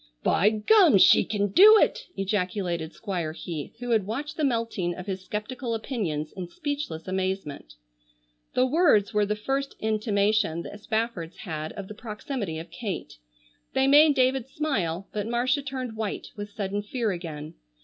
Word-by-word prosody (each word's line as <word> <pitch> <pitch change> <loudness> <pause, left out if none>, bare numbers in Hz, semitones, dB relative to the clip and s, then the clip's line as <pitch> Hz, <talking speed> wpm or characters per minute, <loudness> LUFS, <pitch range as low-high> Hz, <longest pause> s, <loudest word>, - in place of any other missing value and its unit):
"By 200 - +4
gum! 300 - +5
She - - +7
kin 205 -1 -1
do 425 - +8
it!" - - +1
ejaculated 185 -4 -1
Squire 175 -7 -4
Heath, 160 -3 -6
who 245 0 -4
had 215 -4 +2
watched 285 +7 -4
the 310 - -2
melting 230 -9 0
of 180 - -8
his 190 -2 -4
skeptical 230 +4 -4
opinions 185 - -3
in 185 -2 -6
speechless 285 - -4
amazement. 185 - -3 0.8
The 255 - +4
words 260 - +3
were 210 -1 +2
the 210 - 0
first 270 +6 -2
intimation 210 -5 +1
the - - -8
Spaffords 215 -5 -3
had 155 -5 -5
of 200 -2 -7
the 210 - -8
proximity 210 - -5
of 165 +2 -8
Kate. 210 - -5 0.6
They 265 0 +3
made 290 +2 +6
David 260 -1 +2
smile, 195 - -2
but 210 0 -2
Marcia 250 +4 +1
turned 260 -4 -5
white 220 -2 -4
with 205 -1 -6
sudden 200 0 -3
fear 220 +1 -2
again. 160 -4 -6
210 Hz, 160 wpm, -26 LUFS, 185-255 Hz, 0.8 s, do